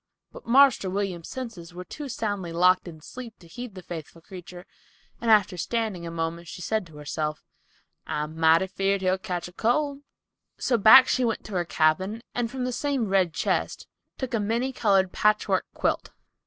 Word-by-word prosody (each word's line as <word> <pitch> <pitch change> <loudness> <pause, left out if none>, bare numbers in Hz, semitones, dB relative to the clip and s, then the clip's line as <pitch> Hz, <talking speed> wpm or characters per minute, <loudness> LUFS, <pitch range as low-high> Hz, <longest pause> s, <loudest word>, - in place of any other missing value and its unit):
But - - -13
"Marster 255 -5 +5
William's" 185 -3 -3
senses 205 -10 -7
were 180 - -6
too 285 - -8
soundly 205 -7 -3
locked 180 +2 +3
in 160 -2 -10
sleep 235 +6 -9
to 175 - -18
heed 240 +3 -8
the 185 - -9
faithful 165 -1 -8
creature, 180 +1 -11 0.5
and 235 - -2
after 205 -4 +4
standing 220 -1 -2
still 165 - -5
a - - -9
moment, 165 +1 -3
she - - -8
said 215 0 -1
to 155 -2 -14
herself, 150 +1 -4 0.6
"I'm 150 +1 -3
mighty 160 +2 +4
feared 195 +1 -1
he'll 185 0 +1
cotch 180 -2 -4
cold." 280 +5 +1 0.6
So 240 -3 +1
back 255 +5 +9
she 255 - +1
went 225 -2 -1
to 215 - -8
her 175 -2 0
cabin 185 +8 +1
and 240 -1 -1
from 255 +1 -4
the 250 - -1
same 265 -4 -1
"red 190 -3 +3
chist" - - -1 0.3
took 260 -3 -4
a 230 - +1
many 235 +5 -1
colored 195 -6 +2
patchwork 210 -2 +1
quilt. - - -1
195 Hz, 180 wpm, -26 LUFS, 175-230 Hz, 0.6 s, back